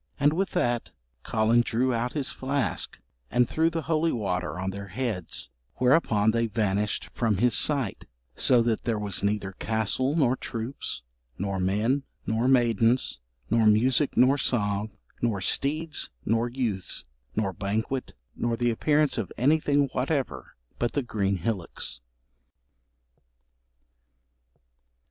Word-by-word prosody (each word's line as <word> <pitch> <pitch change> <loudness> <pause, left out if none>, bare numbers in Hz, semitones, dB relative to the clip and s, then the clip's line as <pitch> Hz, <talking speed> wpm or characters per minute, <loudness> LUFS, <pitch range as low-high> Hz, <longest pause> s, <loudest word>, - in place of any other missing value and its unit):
And 145 +2 +4
with 190 +4 -1
that 120 -1 0 0.3
Collen 115 +2 +3
drew 125 +3 +1
out 120 +3 -1
his 145 -1 -2
flask 135 +1 -2 0.3
and 125 -1 +3
threw 160 +1 +2
the 165 -1 -3
holy 160 0 +1
water 90 -5 -2
on 95 +1 -2
their 100 0 -7
heads, 100 - -4 0.3
whereupon 125 -6 +3
they 115 +1 +1
vanished 105 -1 -1
from 110 -4 +1
his 120 +3 +3
sight, 140 -8 +2 0.3
so 125 -2 +4
that 115 -1 -1
there 115 -3 0
was 105 -3 -1
neither 100 -1 -1
castle 110 +7 0
nor 130 -6 +3
troops, 115 - -5 0.3
nor 100 0 -2
men, 105 +9 +1 0.2
nor 110 +3 +1
maidens, 120 - +3 0.3
nor 115 -1 +4
music, 125 +7 +3
nor 135 +3 +5
song, 105 -5 +1 0.3
nor 115 -4 +1
steeds, 155 - 0 0.2
nor 115 +2 +1
youths, 115 -7 -1 0.3
nor 100 -3 0
banquet, 110 +8 -2 0.2
nor 120 -1 -1
the 120 0 +2
appearance 150 +3 +2
of 105 - -4
anything 145 +1 +3
whatever 130 - -2 0.2
but 120 - 0
the 145 - 0
green 100 -4 0
hillocks.' 95 - -2
115 Hz, 130 wpm, -27 LUFS, 105-130 Hz, 0.3 s, nor